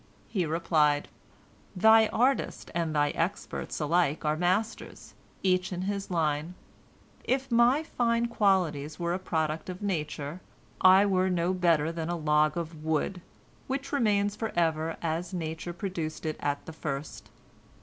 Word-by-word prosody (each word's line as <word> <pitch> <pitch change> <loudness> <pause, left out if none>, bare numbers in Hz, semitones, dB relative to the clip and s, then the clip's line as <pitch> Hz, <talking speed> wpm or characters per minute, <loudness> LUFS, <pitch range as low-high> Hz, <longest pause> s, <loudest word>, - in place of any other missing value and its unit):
He 180 -6 -1
replied: 155 -2 +2 0.7
"Thy 220 +3 +6
artist 255 +5 0
and 165 -2 -1
thy 145 0 +2
experts 175 +5 -3
alike 155 -1 +1
are 150 0 +2
masters, 185 +7 -2 0.3
each 185 0 +1
in 180 0 -3
his 200 +1 -3
line. 160 -1 -1 0.7
If 265 0 -1
my 240 +6 +4
fine 235 -5 0
qualities 185 -10 +1
were 170 0 -1
a 180 - -2
product 160 -2 -2
of 185 +2 -6
nature, 150 -3 -3 0.4
I 190 +2 +7
were 190 -1 +2
no 180 0 +1
better 165 -4 +2
than 165 -1 -4
a 175 - -1
log 150 0 +2
of 160 -2 -5
wood, 160 +4 -1 0.5
which 275 +1 -3
remains 205 -6 +2
forever 165 -6 -1
as 170 +3 -2
nature 160 0 -4
produced 170 -4 -5
it 155 -1 -2
at 145 0 -2
the 160 - -8
first. 145 -1 -5
175 Hz, 140 wpm, -28 LUFS, 155-200 Hz, 0.7 s, I